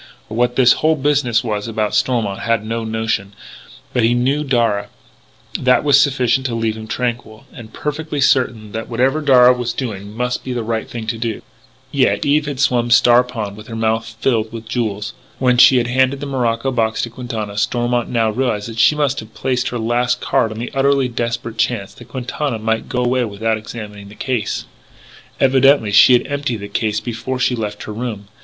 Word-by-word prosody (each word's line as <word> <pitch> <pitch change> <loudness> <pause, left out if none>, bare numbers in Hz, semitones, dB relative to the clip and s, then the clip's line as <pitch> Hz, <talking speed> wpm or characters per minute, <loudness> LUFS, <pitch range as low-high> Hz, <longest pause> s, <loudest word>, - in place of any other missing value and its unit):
What 120 +2 0
this 125 -2 +6
whole 160 +1 +3
business 135 -5 +1
was 105 -2 -3
about 110 -2 -2
Stormont 110 -6 0
had 115 0 0
no 115 +1 -3
notion. 110 -3 -2 0.6
But 125 - +2
he 115 +2 +3
knew 135 +5 +1
Darragh. 115 -7 +1 0.7
That 125 0 +3
was 145 -2 +5
sufficient 130 -2 +1
to 120 - -3
leave 115 -1 -1
him 110 0 -8
tranquil, 115 -2 -4
and 115 -2 -11
perfectly 150 +2 -4
certain 120 -5 +1
that 110 +1 -5
whatever 130 +6 +1
Darragh 125 -3 +5
was 120 -1 -2
doing 105 -4 -6
must 125 0 -2
be 130 - -4
the 120 -2 -2
right 110 0 -3
thing 115 -2 -6
to 115 0 -3
do. 115 -2 -3 0.5
Yet - - +1
Eve 150 +1 +2
had 140 -3 -4
swum 125 -4 +2
Star 120 +1 +6
Pond 110 -5 -5
with 105 +1 -12
her 115 - -7
mouth 115 0 -1
filled 115 -4 0
with 115 -1 -8
jewels. 110 -2 -3 0.2
When 125 -1 +2
she 130 - +8
had 120 - +2
handed 130 +2 +1
the 145 - -5
morocco 125 -2 -1
box 110 -3 0
to 115 - -4
Quintana, 115 -4 -5
Stormont 120 +2 0
now 115 -2 +1
realised 115 -3 -1
that 115 -1 -7
she 130 +7 +5
must 145 -2 0
have 110 0 -11
played 125 0 -1
her 120 - -3
last 120 +2 0
card 110 - +1
on 110 - -7
the 120 +2 -5
utterly 135 -1 +2
desperate 115 -1 -4
chance 110 -3 -1
that - - -14
Quintana 130 0 -3
might 110 +1 -2
go 125 -1 -1
away 125 +1 +1
without 110 +1 -1
examining 105 -2 -9
the 105 - -13
case. 120 -5 -2 0.7
Evidently 135 -4 +4
she 105 +5 +7
had 120 - +3
emptied 140 -4 -2
the 100 -1 -7
case 105 +1 -1
before 120 +2 -4
she 125 0 +1
left 105 -2 -5
her 105 - -6
room. 105 -3 -5
120 Hz, 195 wpm, -18 LUFS, 110-130 Hz, 0.7 s, she